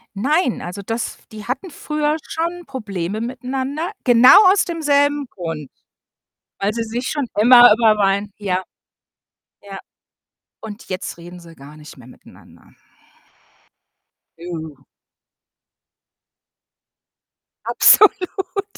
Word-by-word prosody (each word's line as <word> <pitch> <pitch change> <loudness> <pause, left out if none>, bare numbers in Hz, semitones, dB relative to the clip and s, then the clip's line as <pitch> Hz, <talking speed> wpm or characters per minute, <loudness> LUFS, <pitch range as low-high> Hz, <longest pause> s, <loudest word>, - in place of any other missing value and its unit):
Nein, 275 - 0
also, 180 +3 -7
das 225 +3 -5
die 215 -1 -10
hatten 265 +9 -5
früher 300 +1 -2
schon 340 +1 -4
Probleme 210 -6 -5
miteinander, 265 - -4
genau 245 0 +6 0.2
aus 400 - +2
demselben 290 -4 0
Grund, 165 -6 -7 0.9
weil 200 +2 -1
sie 230 -1 -3
sich 240 +3 -5
schon 290 -4 -3
immer 245 0 +8
über 220 -1 +3
Weihn 200 0 0
ja. 190 -3 -2 1.0
Ja. 195 -1 -10 0.8
Und 215 -1 -10
jetzt 185 -2 -6
reden 175 +1 -12
sie 165 -1 -15
gar 145 +2 -15
nicht 150 -1 -14
mehr 125 -2 -16
miteinander. - - -19 1.7
Uh. 160 -5 -8 2.8
Absolut. 400 0 +2
225 Hz, 100 wpm, -19 LUFS, 185-285 Hz, 2.8 s, immer